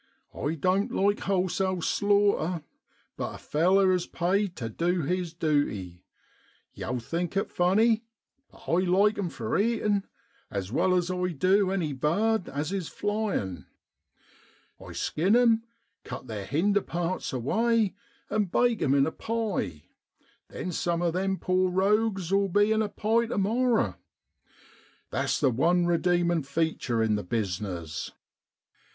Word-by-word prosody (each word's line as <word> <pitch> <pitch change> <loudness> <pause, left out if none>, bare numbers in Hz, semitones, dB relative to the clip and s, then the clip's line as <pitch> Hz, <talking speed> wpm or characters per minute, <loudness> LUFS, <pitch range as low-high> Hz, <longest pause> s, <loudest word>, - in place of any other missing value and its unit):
I 150 +3 -2
doan't 185 +6 +1
like 205 +1 +1
wholesale 185 -1 0
slaughter, 200 -5 +2 0.5
but - - -4
a - - -8
feller 185 +5 +3
is 180 -1 -1
paid 185 +2 0
tu 115 - -4
du 170 +8 -1
his 180 +3 -1
duty. 145 - -1 0.7
Yow'll 125 - -3
think 170 - -3
it 195 - -1
funny, 215 +6 +3 0.5
but - - -18
I 170 - +3
like 195 +4 +3
'em 185 -4 -1
for 115 - -2
eatin' 210 -2 +1 0.4
as 100 -1 -4
well 185 +8 +2
as 180 0 0
I 180 0 -1
du 185 +5 +3
any 175 -6 -1
bird 200 +10 +1
as 145 +4 -3
is 190 -5 -2
a - - -11
flyin'! 195 - -2 1.2
I - - -9
skin 185 +8 +1
'em, 230 -2 +4 0.4
cut - - -7
their 105 -5 -5
hinder 200 +7 +2
parts 175 +1 -3
away, 220 - +1 0.3
and 210 -2 0
bake 240 -2 +2
'em 135 0 +3
in 140 -1 +4
a 160 - -2
pie. 210 - -3 0.9
Some 170 0 -1
of 170 -2 +1
them 190 +1 0
poor 185 0 +1
rogues 195 0 +1
'11 195 -1 +2
be 205 +1 +4
in 220 0 +3
a 215 - -1
pie 225 +3 +1
to 230 - -3
morrer. 230 +4 +1 1.1
That's - - 0
the 135 -3 +3
one 175 +9 +2
redeemin' 175 0 +2
feature 140 -5 -1
in 110 -1 +2
the 105 - -4
business. 90 -5 -3
180 Hz, 145 wpm, -27 LUFS, 150-205 Hz, 1.2 s, em